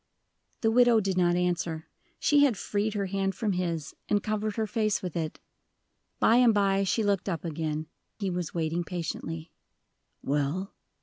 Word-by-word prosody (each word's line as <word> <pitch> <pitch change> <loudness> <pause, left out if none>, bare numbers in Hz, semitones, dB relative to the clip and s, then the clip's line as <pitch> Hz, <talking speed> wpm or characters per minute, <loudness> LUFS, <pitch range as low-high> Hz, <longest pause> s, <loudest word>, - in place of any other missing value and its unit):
The 225 - +3
widow 240 -1 +6
did 195 -2 -1
not 175 -1 +3
answer. 175 -2 -1 0.3
She 290 -1 +4
had 255 -8 +3
freed 210 +3 -1
her 200 -1 0
hand 195 0 -1
from 215 0 -1
his, 170 -4 -2 0.2
and 205 -1 +2
covered 215 -1 -1
her 220 - 0
face 215 -2 0
with 180 -3 -4
it. 160 -2 -3 0.8
By 230 - +5
and 240 -3 +5
by 195 -1 +3
she 220 +4 +1
looked 200 -1 +1
up 170 -4 -3
again 155 -1 -2 0.3
he 195 -3 -2
was 175 -2 -3
waiting 165 +1 -1
patiently. 165 -1 -5 0.7
"Well?" 145 +7 -1
190 Hz, 165 wpm, -28 LUFS, 165-215 Hz, 0.8 s, widow